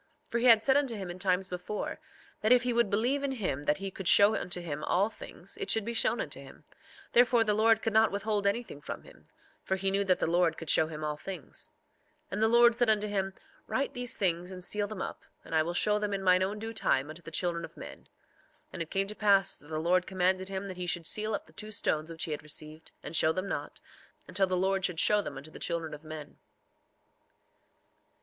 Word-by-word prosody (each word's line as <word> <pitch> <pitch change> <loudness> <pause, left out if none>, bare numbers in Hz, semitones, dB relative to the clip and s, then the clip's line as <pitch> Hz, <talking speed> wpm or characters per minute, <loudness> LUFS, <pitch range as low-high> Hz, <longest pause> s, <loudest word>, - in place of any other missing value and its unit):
3:26 - - -30
For 235 - +1
he 240 - 0
had 225 -2 +7
said 265 +1 +4
unto 275 -5 0
him 190 -4 -5
in 180 - -9
times 185 0 +1
before, 180 +3 -5 0.4
that 215 - +2
if 250 -1 +6
he 245 -1 0
would 235 -3 +2
believe 245 +8 +1
in 280 -1 -1
him 145 - -3
that 150 - +2
he 195 0 -5
could 190 -1 -5
show 205 +2 +7
unto 180 -3 -2
him 150 -4 -5
all 200 +5 +2
things—it 405 - -7
should 220 -2 +2
be 235 - -3
shown 225 - +2
unto - - -3
him; - - -13 0.5
therefore 240 -1 +5
the 210 -2 +1
Lord 225 +1 +3
could 225 - 0
not 220 0 +5
withhold 205 0 -1
anything 200 -8 -2
from - - -7
him, - - -17 0.4
for 190 - -1
he 195 0 -1
knew 200 +1 +1
that 185 -2 +2
the - - 0
Lord 170 -1 +2
could 165 - -1
show 155 - +4
him 155 -1 -7
all 150 -1 -2
things. 190 +4 -7 0.6
3:27 - - -35
And 195 - -2
the 220 - +5
Lord 235 +1 +6
said 240 0 +2
unto 210 -1 +2
him: 195 -2 -2 0.3
Write 275 - -1
these 245 -1 0
things 180 -1 0
and 185 -1 -6
seal 205 +2 0
them 205 -2 -5
up; - - -7 0.2
and - - -9
I 160 - +4
will 170 +2 -2
show 210 +2 +3
them 205 -1 -1
in 195 - -4
mine 185 0 +5
own 195 +3 -1
due 225 +1 -5
time 145 -9 +1
unto 160 +3 -11
the 165 - -9
children 170 0 -1
of - - -9
men. - - -9
3:28 - - -27 0.7
And - - -5
it 165 - -4
came 195 0 0
to 205 - -6
pass 200 -3 +3
that 145 - -17
the 155 0 -4
Lord 180 +3 +2
commanded 185 0 0
him 195 0 -4
that 190 -2 -7
he 180 -1 -4
should 175 -2 0
seal 215 +5 0
up - - -6
the - - -20
two 215 - -7
stones 160 -6 -1
which 165 0 -6
he 160 - -4
had 150 - -3
received, 155 +1 -5
and 165 - -6
show 155 - +4
them 185 +4 -3
not, - - -5 0.5
until 195 -1 +1
the 185 0 0
Lord 190 +1 +1
should 180 -3 0
show 210 +4 +5
them 195 - -7
unto 145 +4 -9
the - - -11
children 165 -2 -2
of 150 +1 -9
men. 155 -2 -9
195 Hz, 250 wpm, -30 LUFS, 170-215 Hz, 0.7 s, had